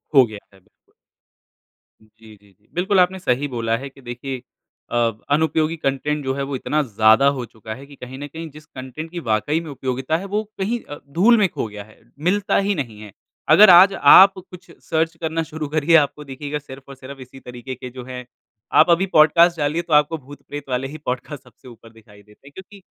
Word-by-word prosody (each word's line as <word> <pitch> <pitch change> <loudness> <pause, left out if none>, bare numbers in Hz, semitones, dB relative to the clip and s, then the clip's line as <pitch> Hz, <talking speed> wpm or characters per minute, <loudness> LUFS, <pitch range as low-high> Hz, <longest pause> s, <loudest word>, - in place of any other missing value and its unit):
हो 135 -2 +7
गया 110 -3 -10
है 95 - -20
बिल्कुल। 90 - -37 1.1
जी, 110 0 -18
जी, 100 0 -25
जी। 105 - -34
बिल्कुल 185 +2 +1
आपने 185 +1 +2
सही 140 -2 -1
बोला 115 -3 -2
है 135 +3 -8
कि 135 - -19
देखिए 125 +1 -6 0.5
अ, - - -3 0.4
अनुपयोगी 160 +1 +1
कंटेंट 150 +1 -2
जो 130 0 -1
है, 140 - -3
वो 135 0 -4
इतना 150 +4 -1
ज़्यादा 110 +3 +4
हो 125 - -4
चुका 110 -1 -10
है 135 +3 -12
कि 140 0 -15
कहीं 130 +1 -10
न 145 - -6
कहीं 160 +2 -8
जिस 155 +1 -14
कंटेंट 130 +4 -9
की 175 - -5
वाक़ई 130 +9 0
में 160 - -9
उपयोगिता 130 +3 -2
है, 190 - -7
वो 210 +2 -2 0.2
कहीं 230 +5 -1
अ, 145 - -9
धूल 215 +10 +4
में 200 -3 +3
खो 115 - -4
गया 105 -1 -9
है, 110 +1 -21 0.2
मिलता 190 +5 +1
ही 200 +1 0
नहीं 120 - -5
है। 105 -2 -11 0.4
अगर 210 -1 +8
आज 185 +3 +8 0.2
आप 195 +1 +8 0.2
कुछ 180 0 -14 0.2
सर्च 165 0 0
करना 165 0 -2
शुरू 155 -1 -6
करिए, 155 +2 +2
आपको 150 -1 +2
दिखेगा 145 +2 -6
सिर्फ़ 135 -1 -12
और 140 - -10
सिर्फ़ 135 +1 -11
इसी 130 +1 -13
तरीके 125 +1 -9
के 125 +1 -9
जो 125 0 -10
हैं 125 -1 -8 0.6
आप 165 - +2
अभी 175 +3 +3
पॉडकास्ट 165 +2 +5
डालिए, 150 +3 -1
तो 165 -2 -5
आपको 150 +2 +3
भूत-प्रेत 145 0 -11
वाले 130 +1 -2
ही 155 +3 -9
पॉडकास्ट 130 +2 -5
सबसे 125 +1 -20
ऊपर 115 -1 -15
दिखाई 105 -2 -19
देते 105 +7 -21
हैं - - -14
क्योंकि 195 +3 -13
140 Hz, 215 wpm, -21 LUFS, 125-165 Hz, 1.1 s, अगर